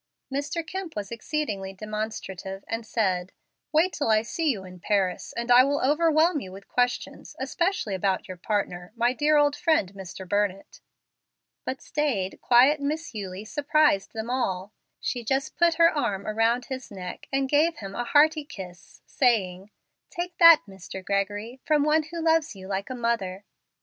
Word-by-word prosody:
Mr. 290 +4 -2
Kemp 375 0 -6
was 205 0 -5
exceedingly 225 -6 -3
demonstrative, 200 -2 -5
and 225 0 -4
said, 185 -5 0 0.4
"Wait 330 +4 +3
till 285 - -1
I 215 0 +4
see 320 +7 -1
you 210 -8 -1
in 180 0 -11
Paris, 190 -1 0
and 235 +1 -1
I 245 +1 +9
will 285 +2 +1
overwhelm 315 +3 +3
you 190 -7 -8
with 195 +1 -12
questions, 245 0 -2
especially 345 - -1
about 190 0 0
your 185 - -7
partner, 180 -2 -2
my 240 +1 +2
dear 300 +3 +3
old 290 0 +3
friend, 315 - +1
Mr. 190 -1 -9
Burnett." 200 0 -1 0.9
But 260 - -4
staid, 250 -11 -1
quiet 260 +5 +5
Miss 305 +2 -3
Eulie 195 -1 -6
surprised 290 -6 +2
them 225 +1 -4
all. 200 -6 -2 0.3
She 245 -1 -3
just 270 +6 -1
put 340 -1 +3
her 335 -1 +5
arms 200 -9 -1
about 225 +3 +1
his 260 -1 -6
neck, 185 -3 -8
and 270 0 +1
gave 310 +4 +3
him 195 -5 -7
a 240 - -2
hearty 305 +3 +4
kiss, 180 -10 -11
saying, 200 -7 +1 0.4
"Take 350 0 -5
that, 335 -2 +9
Mr. 190 -1 -9
Gregory, 205 +5 -2
from 300 -2 +2
one 305 +1 +3
who 335 0 -5
loves 320 -6 +2
you 190 -1 -10
like 195 0 -3
a 255 - -4
mother." 215 -5 -2
235 Hz, 165 wpm, -26 LUFS, 195-295 Hz, 0.9 s, I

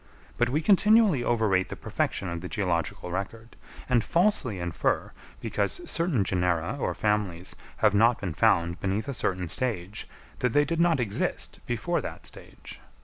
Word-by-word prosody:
But 120 0 +1
we 150 +5 0
continually 210 - +5
overrate 110 -6 +1
the - - -5
perfection 95 - -2
of 85 -1 -4
the 90 - -6
geological 90 -2 -2
record, 110 +5 -5 0.3
and 120 -3 +3
falsely 170 - +1
infer, 85 -1 -1 0.3
because - - -1
certain 165 - +1
genera 90 +2 0
or - - -1
families 105 -5 -1 0.3
have 105 - +5
not 115 +3 +4
been 90 -5 -3
found 85 -3 +2
beneath 100 +6 -1
a 140 - -2
certain 90 -6 -1
stage, 105 0 -3 0.3
that 125 -2 0
they 145 0 +4
did 165 +1 -2
not 170 -4 +3
exist 110 -5 -2
before - - -1
that - - -7
stage. - - -10
105 Hz, 155 wpm, -27 LUFS, 90-130 Hz, 0.3 s, continually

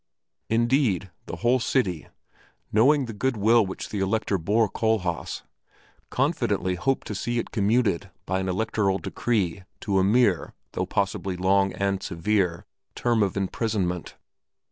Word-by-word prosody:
Indeed 115 - +2 0.2
the - - -5
whole 120 +9 +2
city, 100 - 0 0.7
knowing 135 +6 +4
the 115 - -6
good 125 +3 -1
will 110 +3 +5
which 95 -1 -6
the 105 - -3
Elector 95 0 0
bore 105 +7 +2
Kohlhaas, 100 -5 -1 0.7
confidently 95 +1 0
hoped 95 +10 -1
to - - -4
see 120 +4 -2
it 120 - -3
commuted 100 -3 +1 0.2
by 95 0 0
an 95 0 -2
electoral 100 0 0
decree 100 -5 -1 0.2
to 100 -2 +1
a - - +3
mere, 100 -3 +2 0.2
though - - -2
possibly 95 -2 -1
long 95 +1 +3
and 100 -1 -1
severe, 90 0 0 0.3
term 120 -2 +1
of 100 -1 0
imprisonment. 95 -3 -2
100 Hz, 140 wpm, -25 LUFS, 95-115 Hz, 0.7 s, will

